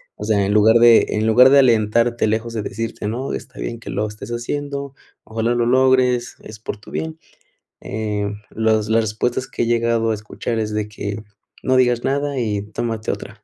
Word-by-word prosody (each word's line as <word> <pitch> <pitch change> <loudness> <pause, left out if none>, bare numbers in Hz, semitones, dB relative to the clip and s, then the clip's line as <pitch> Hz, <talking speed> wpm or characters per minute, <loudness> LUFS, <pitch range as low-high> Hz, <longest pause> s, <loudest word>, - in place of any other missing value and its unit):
O - - -8
sea, 100 -3 +2
en 100 - 0
lugar 110 +2 +5
de 115 -1 +6
en 105 +1 0
lugar 125 +4 +7
de 140 +1 +6
alentarte 115 -1 +3
lejos 110 +2 -1
de 110 - -2
decirte: 110 0 -4
"No, 125 +6 -3
está - - -8
bien - - -4
que - - -10
lo 105 +1 -1
estés 105 0 -9
haciendo, 140 +3 -4 0.3
ojalá 115 +2 -1
lo 120 -1 +1
logres 125 -1 +2
es 105 -1 -10
por 110 - -6
tu 105 - -15
bien". 160 0 -4 0.6
Eh, 105 -1 -3 0.2
los 110 -1 +1
las 115 +1 +3
respuestas 115 +4 -2
que - - -2
he - - +1
llegado 115 -1 +1
a - - +1
escuchar 105 +2 -4
es 110 -1 -2
de 105 0 -2
que: 105 0 -5 0.4
"No 130 - +2
digas 125 -2 +2
nada 140 0 -1
y 105 -4 -1
tómate 115 -1 -2
otra". - - -8
115 Hz, 195 wpm, -20 LUFS, 105-125 Hz, 0.6 s, lugar